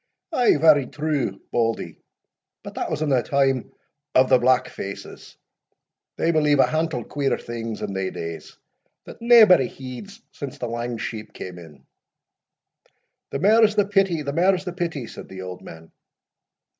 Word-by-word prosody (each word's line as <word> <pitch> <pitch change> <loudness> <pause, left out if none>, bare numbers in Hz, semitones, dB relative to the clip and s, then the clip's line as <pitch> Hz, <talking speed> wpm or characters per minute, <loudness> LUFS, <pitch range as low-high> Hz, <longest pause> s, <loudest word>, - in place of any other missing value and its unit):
"Ay, 245 - +4
very 145 -3 +5
true, 145 -10 -2
Bauldie, 115 -1 -1 0.6
but - - -8
that - - -3
was 155 - -2
in 155 - -1
the 130 -3 +3
time 135 -1 0 0.4
o' 130 - +7
the 130 - +4
blackfaces 120 -5 -2 0.8
they 165 - +2
believed 150 -3 +3
a - - +7
hantle 155 -6 -1
queer 140 +2 -1
things 115 -2 -6
in - - -4
thae 95 -1 -2
days, 85 -2 -7 0.5
that - - -12
naebody 220 - +7
heeds 135 - -10
since 140 -3 -7
the 125 - -4
lang 120 +1 -4
sheep 110 0 -6
cam 90 -1 -8
in." 75 -5 -15 1.4
"The - - -3
mair's 215 +5 +4
the 205 -1 +3
pity, 195 -6 +1
the 140 0 -3
mair's 185 +3 +2
the 180 - -4
pity," 170 -8 -3
said - - -11
the 95 -1 -8
old 90 -1 -8
man. 80 0 -12
135 Hz, 155 wpm, -23 LUFS, 115-170 Hz, 1.4 s, o